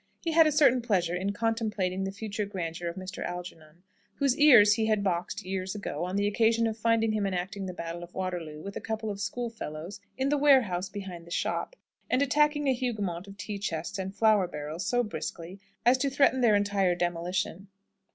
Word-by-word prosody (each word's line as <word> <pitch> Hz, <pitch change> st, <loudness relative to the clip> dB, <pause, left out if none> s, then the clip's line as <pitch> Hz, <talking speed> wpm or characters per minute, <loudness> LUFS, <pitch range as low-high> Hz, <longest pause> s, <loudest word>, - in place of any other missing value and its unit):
He 330 Hz, -, -1 dB
had 325 Hz, 0 st, +6 dB
a -, -, +2 dB
certain 275 Hz, -4 st, +4 dB
pleasure 185 Hz, -7 st, +1 dB
in 190 Hz, +3 st, -1 dB
contemplating 205 Hz, -4 st, -1 dB
the 195 Hz, -, -3 dB
future 205 Hz, 0 st, -4 dB
grandeur 170 Hz, -3 st, -4 dB
of 170 Hz, -, -7 dB
Mr. 190 Hz, -1 st, -6 dB
Algernon, 175 Hz, -2 st, -8 dB, 0.3 s
whose 275 Hz, -3 st, +2 dB
ears 250 Hz, -9 st, +7 dB
he 220 Hz, 0 st, 0 dB
had 215 Hz, -2 st, +1 dB
boxed 185 Hz, +2 st, -2 dB
years 185 Hz, +1 st, -3 dB
ago, 175 Hz, -5 st, -4 dB
on 185 Hz, +1 st, -4 dB
the 200 Hz, 0 st, +1 dB
occasion 225 Hz, +2 st, +2 dB
of 220 Hz, -1 st, -1 dB
finding 225 Hz, 0 st, +2 dB
him 210 Hz, -2 st, 0 dB
enacting 190 Hz, +1 st, -3 dB
the 185 Hz, -, -5 dB
battle 170 Hz, 0 st, -5 dB
of 175 Hz, 0 st, -11 dB
Waterloo, 175 Hz, -5 st, -4 dB
with 200 Hz, 0 st, -7 dB
a -, -, -4 dB
couple 220 Hz, -1 st, -3 dB
of 200 Hz, 0 st, -6 dB
schoolfellows, 205 Hz, -6 st, -5 dB, 0.2 s
in 265 Hz, +1 st, 0 dB
the 295 Hz, 0 st, +2 dB
warehouse 230 Hz, -11 st, +4 dB
behind 190 Hz, -4 st, -8 dB
the -, -, -11 dB
shop, -, -, -2 dB, 0.3 s
and 260 Hz, -, +3 dB
attacking 295 Hz, +1 st, +2 dB
a 265 Hz, -, +4 dB
Hougoumont 205 Hz, -8 st, -3 dB
of 195 Hz, 0 st, -11 dB
tea 205 Hz, 0 st, -5 dB
chests 170 Hz, -1 st, -3 dB
and 190 Hz, +1 st, -4 dB
flour 215 Hz, -4 st, +4 dB
barrels, 155 Hz, +2 st, -5 dB
so 245 Hz, 0 st, +2 dB
briskly, 175 Hz, -1 st, -6 dB, 0.3 s
as 250 Hz, +2 st, +5 dB
to 275 Hz, +1 st, +1 dB
threaten 270 Hz, -1 st, +3 dB
their 225 Hz, -4 st, +5 dB
entire 200 Hz, -3 st, +2 dB
demolition. 175 Hz, +2 st, -2 dB
200 Hz, 200 wpm, -28 LUFS, 180-230 Hz, 0.3 s, ears